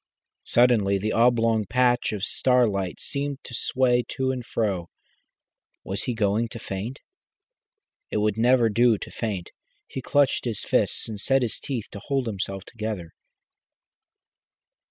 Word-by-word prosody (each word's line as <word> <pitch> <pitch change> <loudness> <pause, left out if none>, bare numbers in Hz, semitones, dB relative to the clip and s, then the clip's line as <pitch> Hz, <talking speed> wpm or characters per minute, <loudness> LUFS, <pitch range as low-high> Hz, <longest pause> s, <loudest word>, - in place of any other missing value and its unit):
Suddenly 115 -5 +4
the 105 +3 -2
oblong 115 -2 +3
patch 125 +1 +2
of 105 -3 -4
starlight 110 -7 +1
seemed 140 -1 -3
to - - -10
sway 125 0 +2
to 130 0 -1
and 125 -2 -4
fro. 100 -7 -2 0.9
Was 100 +2 -3
he 125 - -1
going 110 +1 +1
to 115 - -9
faint? 110 +4 -5 1.1
It - - -2
would 105 -1 +1
never 120 +1 +4
do 115 +1 +4
to - - -8
faint. 100 -7 -4 0.4
He 130 - -5
clenched 140 0 +2
his 115 -4 -2
fists - - +1
and 110 -2 -6
set 135 +2 +3
his 115 - -1
teeth 125 -6 -4
to 100 - -7
hold 135 +4 -1
himself 95 -3 -3
together. 105 -7 -5
115 Hz, 140 wpm, -25 LUFS, 105-125 Hz, 1.1 s, Suddenly